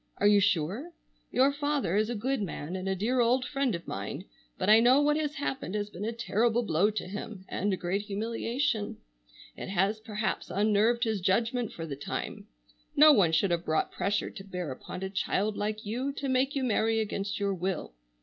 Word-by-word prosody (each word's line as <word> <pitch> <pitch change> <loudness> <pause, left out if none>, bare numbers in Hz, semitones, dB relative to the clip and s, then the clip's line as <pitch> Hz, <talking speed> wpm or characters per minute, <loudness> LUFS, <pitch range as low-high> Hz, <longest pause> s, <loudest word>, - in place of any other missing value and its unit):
Are - - 0
you 205 0 +7
sure? 200 - 0 0.4
Your 270 +2 +4
father 285 - 0
is 215 +2 +2
a 240 - -2
good 260 +4 -1
man, 175 -3 -4
and 190 +1 -3
a 190 - +1
dear 235 +7 0
old 245 +2 +3
friend 275 -5 0
of 170 - -8
mine, - - -5 0.3
but - - -2
I 215 +1 +8
know 250 +4 +6
what 295 0 +3
has 305 -1 -1
happened 270 -8 -3
has 210 0 -2
been 200 +2 -5
a 225 - -1
terrible 235 +1 +1
blow 180 +1 +2
to 215 -3 -4
him, 200 0 -7
and 205 +2 -1
a 190 - 0
great 185 +3 -1
humiliation. 225 +3 -2 0.6
It - - -7
has 195 +3 +1
perhaps 215 0 -3
unnerved 215 +4 +2
his 220 -5 0
judgment 230 +5 +1
for 165 - -6
the 145 -4 -5
time. 140 - -5 0.5
No 305 +1 +8
one 185 - +4
should 175 +4 +2
have 170 0 0
brought 155 -2 0
pressure 205 +1 -1
to 195 - -9
bear 180 -6 -5
upon 180 +7 -7
a 190 - -2
child 205 +1 0
like 215 +1 -3
you 250 +7 -2
to 280 0 -4
make 265 +2 +1
you 275 - 0
marry 225 -2 +2
against 200 -2 -2
your 200 -1 0
will. 185 - -3
210 Hz, 205 wpm, -29 LUFS, 195-245 Hz, 0.6 s, I